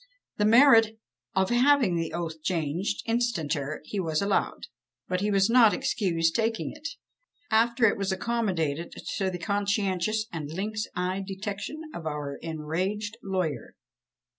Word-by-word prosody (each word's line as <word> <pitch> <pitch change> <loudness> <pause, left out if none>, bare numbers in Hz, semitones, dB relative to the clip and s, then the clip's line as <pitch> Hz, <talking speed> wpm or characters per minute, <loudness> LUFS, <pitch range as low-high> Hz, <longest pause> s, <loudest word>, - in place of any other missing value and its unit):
The 210 - +2
merit 225 -1 +6 0.4
of 190 +2 +2
having 250 -5 +4
the 165 -1 -2
oath 165 -2 -4
changed, 170 +4 -1
instanter, 165 - -1
he 200 - -4
was 160 -4 0
allowed; 200 0 0 0.4
but 180 0 -1
he 205 - +1
was 195 -1 +3
not 230 -2 +6
excused 175 -11 0
taking 225 0 0
it, 310 +1 -7 0.6
after 235 +2 +4
it 205 - +3
was 195 -1 0
accommodated 185 -8 -1 0.3
to 190 -1 0
the 180 - -4
conscientious 200 +2 0
and 155 -3 -4
lynx 210 +6 -3
eyed 185 +2 -2
detection 200 +10 -5
of 165 -2 -6
our 145 -2 -4
enraged 185 +7 -3
lawyer. 185 - -3
195 Hz, 140 wpm, -27 LUFS, 165-220 Hz, 0.6 s, merit